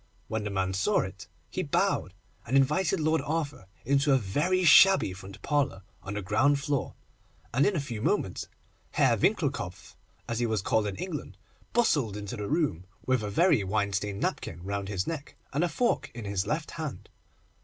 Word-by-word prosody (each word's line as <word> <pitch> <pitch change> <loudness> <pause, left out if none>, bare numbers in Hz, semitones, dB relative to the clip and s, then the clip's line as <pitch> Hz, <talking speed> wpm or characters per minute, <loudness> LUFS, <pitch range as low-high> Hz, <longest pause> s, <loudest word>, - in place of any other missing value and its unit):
When 110 -1 -2
the 105 - -3
man 95 -1 -1
saw 95 0 +2
it - - -7 0.2
he - - -2
bowed, 90 - 0 0.3
and 130 +4 +3
invited 150 +8 +2
Lord 155 +1 +2
Arthur 145 -10 -3 0.2
into 140 +2 +3
a - - +6
very 150 - +1
shabby 185 - +7
front 95 +1 -10
parlour 140 -9 0 0.2
on 95 +2 -6
the 105 - -3
ground 135 +10 +3
floor, 140 -1 -2 0.6
and 130 +4 +4
in 205 - +1
a - - +1
few 120 -6 -5
moments - - 0 0.5
Herr - - +4
Winckelkopf, - - -1 0.3
as 115 0 -2
he 120 - +1
was 110 -4 -1
called 110 0 +1
in 100 - -3
England, 165 - -6 0.3
bustled 145 - +2
into 105 +2 -5
the 105 -3 -4
room, 145 - 0 0.2
with 130 -2 +2
a 105 - -3
very 115 - +3
wine 100 +1 0
stained 100 +1 -2
napkin 85 +2 -3
round 100 0 -3
his 95 -3 -1
neck, 155 -4 -5 0.2
and 150 +5 +1
a 175 - +1
fork 240 +9 0
in 115 -3 -6
his 100 -1 -1
left 155 +1 -2
hand. 150 - -6
115 Hz, 185 wpm, -28 LUFS, 100-150 Hz, 0.6 s, shabby